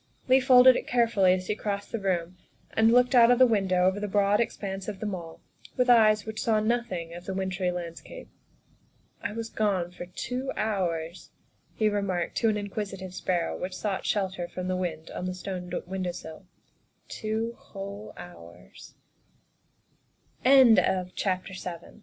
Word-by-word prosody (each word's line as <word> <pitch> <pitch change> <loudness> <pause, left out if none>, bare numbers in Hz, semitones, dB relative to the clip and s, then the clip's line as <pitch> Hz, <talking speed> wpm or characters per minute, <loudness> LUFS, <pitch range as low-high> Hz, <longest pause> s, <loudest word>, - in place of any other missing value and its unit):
Leigh 260 +1 +6
folded 255 -1 +7
it - - -3
carefully 230 -6 +3
as 185 0 0
he 210 - -1
crossed 200 -1 -4
the 230 - -2
room 180 -3 -1 0.4
and 220 +1 +4
looked 250 +2 +4
out 235 -2 +7
of 245 - +5
the 255 - +7
window 190 -6 +2
over 190 +2 +2
the 210 - -3
broad 205 +1 +2
expanse 195 -4 -3
of 205 -3 -5
The - - -5
Mall 175 -5 -6 0.4
with 250 -1 +4
eyes 215 -3 +5
which 220 0 -5
saw 220 -2 +2
nothing 215 -7 -2
of 175 +1 -9
the 190 - -4
wintry 190 -1 -1
landscape. 175 - -7 0.5
" - - -39
I - - -3
was 225 +1 -6
gone 190 -5 0
for 180 0 -9
two 250 +8 -4
hours," 175 -5 -2 0.5
he 215 - +2
remarked 200 -4 -1
to 225 - +3
an 210 - 0
in 205 -1 -5
quisitive 195 -3 -5
sparrow 175 -2 -1
which 185 0 -4
sought 200 -3 -2
shelter 190 -4 -1
from 180 +1 -6
the 185 - 0
wind 175 -3 -4
on 180 - -5
the 185 0 -3
stone 180 -1 -6
window 185 0 -3
sill, 165 +3 -10 0.3
" - - -42 0.3
two 220 +1 -3
whole 200 +1 -9
hours." 85 - -14 1.5
THE 220 -9 +5
SECRETARY 185 -1 -2 0.2
O - - -17
195 Hz, 170 wpm, -27 LUFS, 180-220 Hz, 1.5 s, folded